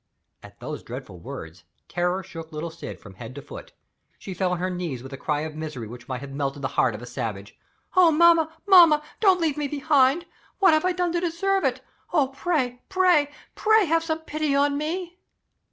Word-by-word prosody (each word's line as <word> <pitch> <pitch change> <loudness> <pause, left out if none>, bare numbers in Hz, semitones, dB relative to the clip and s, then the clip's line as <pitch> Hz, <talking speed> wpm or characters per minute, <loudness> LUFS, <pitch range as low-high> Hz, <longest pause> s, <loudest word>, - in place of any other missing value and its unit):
At - - -15
those - - -6
dreadful - - -9
words, 80 +1 -9 0.2
terror 180 +2 -1
shook 165 -2 -9
little 155 +2 -5
Syd 165 - -8
from 95 - -13
head 115 +6 -10
to 140 - -7
foot. - - -10 0.5
She 190 - -7
fell 185 0 0
on - - -1
her 185 +2 -2
knees 170 -9 -4
with 135 +1 -9
a - - -3
cry 150 +2 -2
of 155 0 -5
misery 150 -7 -6
that 120 +3 -11
might 130 -1 -3
have 140 -1 -8
melted 140 0 -3
the 130 - 0
heart 120 -4 +1
of 110 - -9
a - - -6
savage. 115 -5 -5 0.4
"Oh, 365 -2 +7
mamma, 330 0 +5
mamma, 340 -6 +7 0.2
don't 385 -4 +5
leave 315 -4 0
me 295 -1 -1
behind! 290 +2 +2 0.3
What 380 -5 +5
have 310 +2 +2
I 365 - +3
done 355 -1 0
to 345 - 0
deserve 380 +3 0
it? - - 0 0.3
Oh, 290 -6 +2
pray, 270 -4 -1
pray, 360 -6 +3 0.2
pray 435 -1 +4
have 330 0 +2
some 320 -1 -2
pity 310 -2 -1
on 285 0 +3
me!" 345 +4 -4
275 Hz, 205 wpm, -25 LUFS, -, 0.5 s, Oh